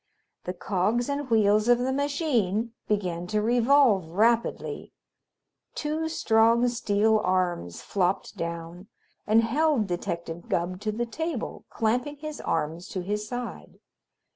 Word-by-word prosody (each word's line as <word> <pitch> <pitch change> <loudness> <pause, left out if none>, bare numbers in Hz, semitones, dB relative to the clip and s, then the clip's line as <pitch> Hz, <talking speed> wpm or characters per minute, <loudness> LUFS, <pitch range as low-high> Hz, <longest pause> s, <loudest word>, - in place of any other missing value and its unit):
The 180 - -4
cogs 210 +8 0
and 280 -1 -2
wheels 215 -1 +3
of 245 0 +6
the 255 +2 -1
machine 250 - 0
began 180 -5 -1
to 215 +2 0
revolve 235 - +3
rapidly. 230 +6 0 0.8
Two 315 +2 -2
strong, 230 -4 +3
steel 220 -2 +2
arms 180 - -1
flopped 190 -1 -1
down 170 +2 -6 0.4
and 220 +2 +5
held 280 0 +2
Detective 170 -2 -4
Gubb 180 +2 -1
to 215 0 -1
the 235 +3 -2
table, 310 +2 -4
clamping 245 +6 0
his 305 +1 -6
arms 165 +4 -2
to 185 - -4
his 210 +3 -3
side. 245 0 -6
220 Hz, 125 wpm, -27 LUFS, 185-245 Hz, 0.8 s, of